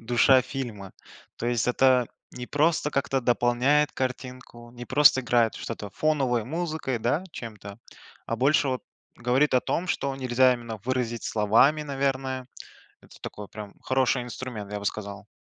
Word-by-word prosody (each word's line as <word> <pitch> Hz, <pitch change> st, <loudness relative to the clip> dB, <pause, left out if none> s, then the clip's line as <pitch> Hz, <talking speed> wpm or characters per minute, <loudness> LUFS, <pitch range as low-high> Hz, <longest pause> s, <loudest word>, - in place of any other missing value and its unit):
душа 120 Hz, +3 st, +4 dB
фильма, 120 Hz, -7 st, -6 dB, 0.4 s
то 115 Hz, -, -4 dB
есть 120 Hz, -2 st, 0 dB
это 125 Hz, -1 st, +3 dB, 0.3 s
не 125 Hz, -, -7 dB
просто 150 Hz, +1 st, +1 dB
как-то 135 Hz, -1 st, 0 dB
дополняет 125 Hz, +5 st, +2 dB
картинку, 125 Hz, -2 st, -6 dB
не 120 Hz, 0 st, -9 dB
просто 135 Hz, 0 st, +5 dB
играет 120 Hz, -2 st, +2 dB
в -, -, -9 dB
что-то 105 Hz, -3 st, -6 dB
фоновой 135 Hz, -4 st, 0 dB
музыкой, 155 Hz, -3 st, -3 dB
да, 130 Hz, +10 st, 0 dB
чем-то, 105 Hz, -5 st, -9 dB, 0.5 s
а 115 Hz, -, -2 dB
больше 140 Hz, +3 st, +3 dB
вот 130 Hz, -1 st, -2 dB, 0.3 s
говорит 125 Hz, +5 st, +2 dB
о 125 Hz, -, +5 dB
том, 175 Hz, +7 st, -2 dB
что 140 Hz, -4 st, -1 dB
нельзя 130 Hz, -1 st, +3 dB
именно 120 Hz, -2 st, -5 dB
выразить 120 Hz, -2 st, -2 dB
словами, 115 Hz, +8 st, +3 dB
наверное. 135 Hz, -2 st, -2 dB, 0.5 s
Это -, -, -18 dB
такой 105 Hz, -1 st, -8 dB
прям 105 Hz, -2 st, -9 dB
хороший 130 Hz, -1 st, +1 dB
инструмент, 120 Hz, -4 st, -7 dB
я 105 Hz, -, -2 dB
бы -, -, -9 dB
сказал. 100 Hz, 0 st, -5 dB
125 Hz, 150 wpm, -26 LUFS, 115-135 Hz, 0.5 s, просто